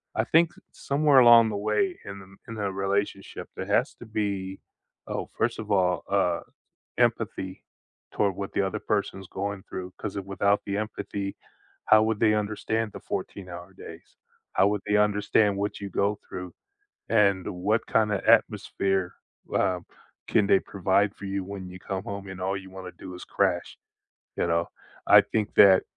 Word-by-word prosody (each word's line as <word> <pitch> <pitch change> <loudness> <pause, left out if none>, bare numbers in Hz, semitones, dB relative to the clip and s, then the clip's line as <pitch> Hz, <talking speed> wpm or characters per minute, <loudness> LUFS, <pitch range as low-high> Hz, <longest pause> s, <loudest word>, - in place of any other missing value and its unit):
I 110 - +2
think 165 +7 +4 0.2
somewhere 140 -1 +3
along 120 -2 +8
the 105 - -3
way 110 - 0
in 100 0 -7
the 95 0 -14
in 115 - -7
the 100 -2 -2
relationship 95 0 -2
there - - -4
has - - +2
to - - -12
be 100 -3 -3 0.5
Oh, - - -4
first - - 0
of 110 -1 -6
all, 90 -2 +2
uh, 90 -4 +2 0.6
empathy 95 0 0 0.5
toward 100 -2 +1
what 100 0 -5
the - - +2
other 95 -1 -2
person's 100 -2 -2
going 100 0 -4
through, 90 0 -6
'cause, 100 - -5
it 100 - -4
without 100 +1 +1
the 100 - -2
empathy, 100 -2 -4 0.5
how 110 0 +6
would 110 -1 0
they 110 -1 +4
understand 110 +1 -1
the - - -9
14-hour 90 -1 -6
days? 85 -2 -12 0.4
How 100 - +4
would 105 -1 0
they 105 0 +3
understand 105 0 +3
what 100 +1 -2
you 100 - -5
go 100 +2 0
through, 90 -1 -7 0.6
and 100 -3 +3
what 100 +5 0
kinda 105 -3 +1
atmosphere, 95 -2 +2 0.4
uh, 90 -1 +1 0.5
can 105 -2 +3
they 95 - +5
provide 100 +1 +1
for 100 - -9
you 100 0 -2
when 95 -1 -7
you 90 - -9
come 95 +1 -4
home, 100 -3 -6
and 95 -1 -8
all 95 +2 -1
you 95 0 -10
want 95 -1 -8
to 90 - -12
do 95 - -7
is 90 - -9
crash, 95 -3 0 0.6
you - - +1
know? 85 0 +1 0.4
I - - +9
think 105 -2 -2
that, 95 -2 +7
100 Hz, 175 wpm, -26 LUFS, 95-105 Hz, 0.6 s, I